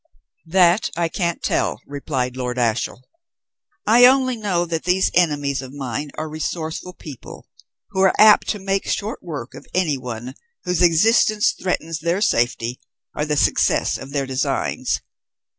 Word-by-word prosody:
"That 180 +3 +3
I 170 0 0
can't 170 -1 -2
tell," - - 0
replied 135 -3 -3
Lord 125 -1 -3
Ashiel. 120 +1 -1 0.8
"I 240 +3 +7
only 260 -1 +3
know 195 -6 -1
that 165 -1 -3
these 180 +2 +2
enemies 145 -5 +1
of 130 0 -10
mine 140 +1 -4
are 155 - -3
resourceful 160 +3 -4
people, 145 -7 -11 0.4
who 190 - -1
are 190 - +4
apt 215 -1 +6
to 210 - 0
make 195 0 -2
short 215 +2 -3
work 145 -7 -7
of - - -12
anyone 130 -8 -2 0.3
whose 180 -1 -1
existence 210 +5 +4
threatens 165 -3 -3
their 170 +4 0
safety 120 - 0 0.4
or 150 - -1
the 150 -1 -1
success - - +2
of 135 - -9
their 140 -1 -2
designs. 130 0 -1
160 Hz, 145 wpm, -21 LUFS, 135-185 Hz, 0.8 s, I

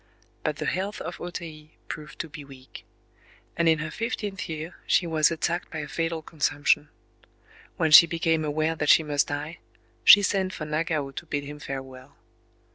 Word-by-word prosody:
But - - -1
the - - -5
health 195 +3 -2
of - - -7
O 175 - -4
Tei 155 -3 -9
proved 150 -2 -8
to 170 - -8
be 145 -1 -10
weak; 135 -2 -13 0.7
and 170 -1 +2
in 160 - +4
her 155 +1 -5
fifteenth 210 -2 -4
year 160 +1 -6
she 180 - +3
was 160 -2 +3
attacked 170 +1 -2
by 160 - -7
a 150 -2 -4
fatal 165 +1 -3
consumption. 145 -1 0 0.9
When 160 -1 +1
she 165 +2 +10
became 165 -1 0
aware 155 +2 0
that 150 -1 -2
she 160 - +7
must 145 -2 0
die, 145 +3 -5 0.4
she 205 - +9
sent 190 -1 0
for 155 - -5
Nagao 155 -2 -2
to 135 - -8
bid 145 -1 -2
him 145 +1 -9
farewell. 135 -1 -8
155 Hz, 180 wpm, -26 LUFS, 145-165 Hz, 0.9 s, she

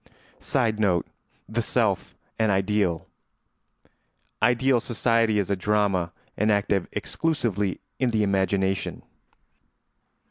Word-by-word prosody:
[Sidenote: 110 - +1 0.4
The - - -1
self - - 0 0.2
an 110 -1 +3
ideal.] 95 -3 +1 1.3
Ideal 125 +2 +3
society 115 -1 +1
is 100 -1 0
a - - +3
drama 95 -3 +1 0.3
enacted 100 -2 +2
exclusively 110 - -1 0.2
in 130 -1 +2
the 110 -2 +1
imagination. 95 -1 0
105 Hz, 85 wpm, -25 LUFS, 95-115 Hz, 1.3 s, an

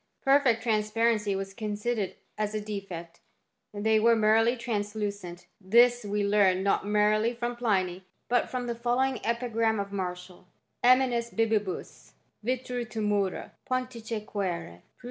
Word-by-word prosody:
Perfect 270 -5 +4
transparency 215 -2 +1
was 195 0 -4
considered 210 -1 -2 0.2
as 215 0 -2
a - - 0
defect, 190 -5 -7 0.5
they 215 +1 +2
were 230 +1 +5
merely 225 +2 +3
translucent; 205 -5 -4 0.2
this 240 +4 +5
we 205 0 -1
learn 195 -2 +3
not 200 0 +1
merely 215 +3 +2
frora 240 +1 -3
Pliny, 190 -6 0 0.2
but 245 0 +1
from 250 -1 -3
the 240 - -2
following 245 +2 0
epigram 230 -2 0
of 200 0 -4
IWartial: 180 -2 -5 0.4
Nob 250 +1 +8 0.4
bibimus 215 -4 -2 0.3
vitro, 250 +1 -2
tu 225 -1 -7
tnurrH, 205 -3 -1 0.2
Pantice: 235 -4 -3
qunre 175 - -4
215 Hz, 125 wpm, -28 LUFS, 200-235 Hz, 0.5 s, Nob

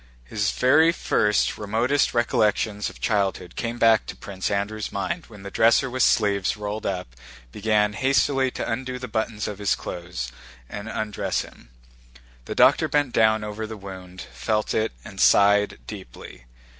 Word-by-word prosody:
His 105 - -1
very 155 +9 +4
first, 105 -10 +1
remotest 115 +7 +1
recollections 110 -3 +1
of - - -14
childhood 95 -4 -1
came 115 +1 -3
back 115 -2 +4
to - - -6
Prince 95 -2 -5
Andrew's 100 +1 -2
mind 100 - -3
when 105 -4 -13
the 100 - -7
dresser 115 +5 +3
with 130 +1 -2
sleeves 100 -4 +2
rolled 105 +1 -4
up 90 -11 -4 0.4
began 105 - +1
hastily 135 +2 +2
to - - -5
undo 125 +2 -3
the 125 0 -6
buttons 110 -1 -2
of 105 -1 -6
his 100 - +1
clothes 85 -8 -6 0.4
and 105 - -7
undressed 110 -2 -2
him. - - -16 0.8
The - - -5
doctor - - +5
bent 145 -4 0
down 110 -1 +3
over 105 +1 -5
the 110 0 -7
wound, 95 -2 -10
felt 105 -1 -1
it, 110 0 0
and - - -6
sighed 100 0 +4
deeply. 60 - -10
105 Hz, 155 wpm, -24 LUFS, 100-115 Hz, 0.8 s, doctor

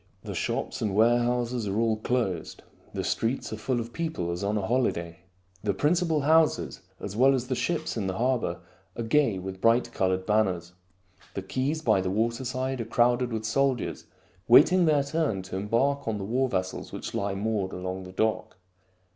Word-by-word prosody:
The - - -5
shops - - -2
and 105 -3 -1
warehouses 120 +1 +2
are 100 +1 -1
all 115 -1 +2
closed. 110 -7 -2 0.3
The - - -3
streets 115 -1 -1
are - - -4
full 120 +3 -1
of 115 0 -6
people 160 - -2
as 85 +3 -4
on 105 +2 0
a 100 - -1
holiday. 85 -9 -1 0.4
The 100 -2 0
principal 160 - +2
houses, 160 +2 +2 0.2
as 100 - -6
well 135 +4 +5
as 125 -1 -3
the 130 - +1
ships 160 +3 -1
in 105 -4 -2
the 95 0 -3
harbor, 120 -8 0 0.4
are 115 - -2
gay 115 -3 +2
with 95 0 -7
bright 115 +1 +3
colored 95 -3 0
banners. 95 -5 +1 0.6
The 95 - -3
quays 135 +10 -2
by 95 - +3
the 95 - -2
waterside 125 +5 -1
are - - -4
crowded 120 +2 +2
with 110 -1 -3
soldiers 130 +2 0 0.4
waiting 175 +9 +7
their 150 -3 +3
turn 140 - -1
to 95 0 -7
embark 115 +9 0
on 110 -2 0
the 95 - -4
war 130 +5 +1
vessels 95 -2 -3
which - - -6
lie 100 -1 -1
moored 100 -2 -1
along 95 +1 -5
the 90 - -9
dock. 110 0 -1
115 Hz, 180 wpm, -27 LUFS, 95-130 Hz, 0.6 s, waiting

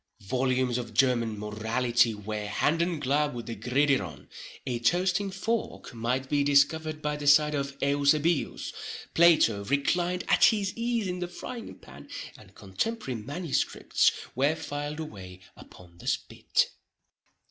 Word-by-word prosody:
Volumes 130 +1 +1
of 120 - -7
German 120 -4 +2
morality 115 +2 +1
were 105 0 -5
hand 150 +10 +1
and 170 -2 0
glove 145 +1 +1
with 120 -2 -6
the 115 - -5
gridiron—a 125 - -2
toasting 180 +9 +1
fork 210 - -3
might 125 +3 -2
be 145 0 +1
discovered 155 +2 +2
by 150 0 -1
the 145 0 -5
side 150 +1 +6
of 140 -1 -3
Eusebius—Plato 145 -3 +2
reclined 175 - 0
at - - +5
his 205 -4 +2
ease 235 -2 -1
in 180 0 -3
the 175 - -3
frying 230 +7 -8
pan—and - - -12
contemporary 130 - -3
manuscripts 145 +5 0 0.2
were 140 +5 +2
filed 145 -1 -5
away 95 - -8 0.2
upon 85 -1 -16
the - - -11
spit. - - 0
140 Hz, 125 wpm, -28 LUFS, 120-160 Hz, 0.2 s, side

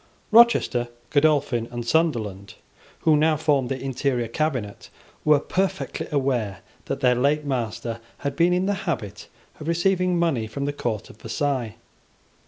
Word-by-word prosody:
Rochester, 220 - +5 0.2
Godolphin, 145 -5 +2
and 120 -1 -5
Sunderland, 110 - 0 0.5
who 155 - +4
now 155 +1 +3
formed 145 -5 +1
the 135 - -2
interior 130 -2 -1
cabinet, 125 -5 -3 0.3
were 150 -1 +5
perfectly 190 +6 -2
aware 125 -9 -1 0.2
that - - -4
their 125 -1 +5
late 145 +4 +1
master 115 -3 -3 0.3
had 140 -1 -1
been 170 +1 +3
in 180 +1 +1
the 205 - +1 0.2
habit 105 - -4 0.3
of 155 - -7
receiving 180 +1 +2
money 150 -10 +1
from 140 +5 -4
the 145 - -1
court 115 -7 -3
of - - -19
Versailles. 125 -1 -2
140 Hz, 145 wpm, -24 LUFS, 120-155 Hz, 0.5 s, Rochester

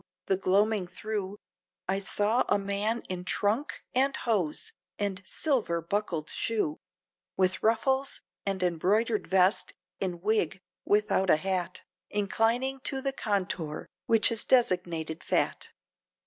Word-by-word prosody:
the 190 - +2
gloaming 195 +1 +2
thro' 205 0 -4 0.5
I 190 +1 +1
saw 210 +4 +2
a - - +4
man 200 +3 -1
in 180 -1 -4
trunk 210 +9 0
and 270 +2 +2
hose, 190 -10 -1 0.2
and 200 -2 -2
silver 245 - +1
buckled 170 -2 -2
shoe, 210 -9 -1 0.6
With 185 0 +2
ruffles 265 +5 +2 0.2
and 195 -2 -1
embroidered 205 +6 +1
vest, 190 +2 +3 0.3
in 180 -3 -2
wig 195 -3 0 0.3
without 205 -2 +2
a - - +7
hat, 185 +2 -2 0.3
Inclining 225 +6 +1
to 270 0 0
the 270 0 -1
contour, 185 - -2 0.2
which 225 0 +4
is 225 - +1
designated 175 -9 +1
fat. - - 0
200 Hz, 120 wpm, -29 LUFS, 185-225 Hz, 0.6 s, a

